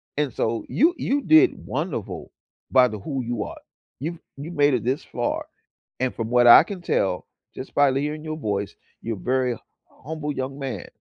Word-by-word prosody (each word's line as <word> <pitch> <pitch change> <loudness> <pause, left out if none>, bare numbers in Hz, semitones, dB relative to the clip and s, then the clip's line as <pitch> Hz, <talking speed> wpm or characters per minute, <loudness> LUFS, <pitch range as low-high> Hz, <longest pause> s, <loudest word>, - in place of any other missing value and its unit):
and 145 -4 -1
so 115 0 -1
you 325 +6 +3
you 285 +1 0
did 320 +6 +4
wonderful - - -4 0.4
by 130 -1 +6
the 110 - -5
who 135 +5 -3
you 120 -2 -2
are. - - -8 0.4
You've 165 +4 -4 0.2
you've 160 +5 -7
made 145 -1 +4
it 120 -2 0
this 130 +3 0
far, - - -3 0.5
and 130 -1 +1
from 115 -1 -4
what 120 0 +5
I 120 - +10
can 185 -1 -7
tell, 95 - 0 0.3
just 130 - -8
by 145 -1 +5
hearing 150 +3 -2
your 155 0 -4
voice, 100 -8 -2 0.3
you're 115 -1 -3
very 125 +2 0 0.5
humble 150 -1 -3
young 135 +1 -4
man. 135 -3 -5
135 Hz, 180 wpm, -24 LUFS, 120-155 Hz, 0.5 s, I